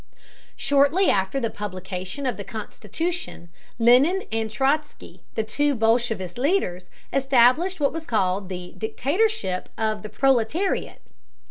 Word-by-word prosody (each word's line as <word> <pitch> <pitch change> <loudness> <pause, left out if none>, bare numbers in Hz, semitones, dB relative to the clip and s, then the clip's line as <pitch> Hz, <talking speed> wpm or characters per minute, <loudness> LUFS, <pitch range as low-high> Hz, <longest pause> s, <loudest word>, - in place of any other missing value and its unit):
Shortly 285 +7 +3
after 190 +7 0
the 230 -3 -2
publication 185 +4 -5
of 250 - 0
the 200 - -6
constitution, 230 - -5 0.3
Lenin 255 +11 +4
and 225 0 -1
Trotzky, 275 +7 -2
the 220 - 0
two 285 +6 0
bolshevist 225 -4 0
leaders, 250 - 0 0.2
established 275 +7 +3
what 285 -1 +1
was 325 0 -6
called 190 -3 0
the 180 -1 -7
"dictatorship 275 - -1
of 215 -1 -1
the 215 - -7
proletariat." 270 - 0
240 Hz, 120 wpm, -24 LUFS, 205-290 Hz, 0.3 s, Lenin